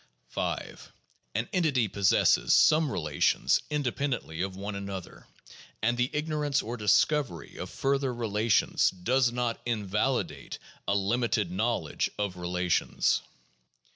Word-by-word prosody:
5. - - -4 0.4
An - - 0
entity 150 - +2
possesses 100 -1 +3
some 155 -2 +5
relations 80 -9 +1
independently 135 - -2
of 95 0 -3
one 100 +2 -5
another; 100 -2 -7 0.6
and 120 +2 +2
the 125 +1 +1
ignorance 150 -2 -1
or 115 +3 -4
discovery 105 - +1
of - - -6
further 135 -1 0
relations 110 -2 +2
does 120 +7 +1
not 120 -1 -2
invalidate 110 +3 -1 0.3
a 100 - +2
limited 105 -1 0
knowledge 95 -5 -1
of 100 -3 -2
relations. 90 0 +1
115 Hz, 110 wpm, -28 LUFS, 95-135 Hz, 0.6 s, some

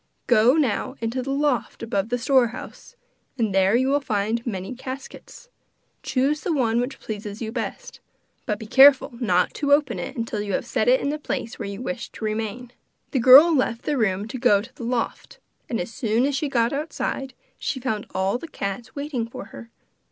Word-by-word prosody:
Go 245 0 +5
now 265 -3 0
into 235 +3 -2
the 265 - -6
loft 275 -4 -1
above 205 -2 -1
the 245 - 0
store 255 0 +3
house 245 - -10 0.4
and 220 -5 0
there 195 +2 +4
you 260 +2 +2
will 285 +1 +3
find 220 -1 -1
many 190 -1 -4
caskets. 265 - -9 0.5
Choose 280 +3 0
the 360 - -2
one 240 -6 +1
which 265 +2 -4
pleases 210 -1 -6
you 220 -2 -4
best, 245 - -5 0.5
but 210 -3 0
be 220 - -9
careful 270 +4 +6
not 180 -7 +2
to 285 -1 +1
open 285 -4 +2
it 270 - -6
till 215 -2 -3
you 205 -2 -3
have - - -1
set - - -1
it - - +5
in - - -1
the 300 +1 -2
place 235 -5 -4
where 205 -3 -4
you 200 +4 -6
wish 255 -1 -4
it - - -31
to 220 - -6
remain.' 220 +3 -3 0.4
The 265 - +1
girl 270 +8 +9
left 240 -4 0
the 295 - -1
room 205 -4 0
to 255 - -5
go 235 -5 +4
to 235 +6 -10
the - - -10
loft, 235 0 -3 0.3
and 230 - -1
as 180 +6 -5
soon 230 -1 +1
as 285 -1 0
she 285 +1 -1
got 235 -2 +1
outside, 280 -2 -3 0.2
she 265 - -2
found 220 -5 -3
all 190 +5 0
the 330 - -8
cats 200 -1 -5
waiting 280 -5 -3
for 230 - -8
her. 230 - -10
245 Hz, 205 wpm, -24 LUFS, 220-270 Hz, 0.5 s, girl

